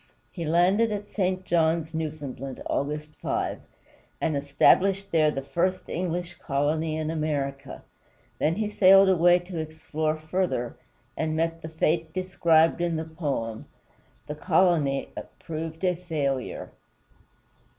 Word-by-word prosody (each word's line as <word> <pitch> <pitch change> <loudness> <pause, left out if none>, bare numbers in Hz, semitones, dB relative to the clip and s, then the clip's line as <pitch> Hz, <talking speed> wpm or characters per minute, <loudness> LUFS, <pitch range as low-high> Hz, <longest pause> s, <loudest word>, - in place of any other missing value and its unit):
He 170 -3 -5
landed 185 +8 +3
at 205 0 -5
St. 185 -2 -1
John's, 165 -1 +1
Newfoundland, 145 -4 -5
August 150 +2 -2
5, - - -2 0.6
and 160 -2 0
established 190 +8 +3
there 155 -2 +4
the 135 -2 -3
first 185 +6 -1
English 175 -1 -3
colony 155 +3 0
in 155 0 -2
North 160 -1 -2
America. 140 -3 -3 0.6
Then 160 +2 +2
he 215 +1 -1
sailed 195 -1 +6
away 175 -1 +5
to 175 -1 -6
explore 155 0 -2
further, 155 -6 -2 0.4
and 155 0 -1
met 165 +1 -1
the 160 - -7
fate 160 0 0
described 170 -3 +3
in 170 -1 0
the 160 0 -3
poem. 140 -9 -4 0.6
The 150 - -5
colony 155 -3 +2 0.3
proved 160 +1 -6
a 180 -1 +2
failure. 150 -7 -3
160 Hz, 130 wpm, -26 LUFS, 150-175 Hz, 0.6 s, sailed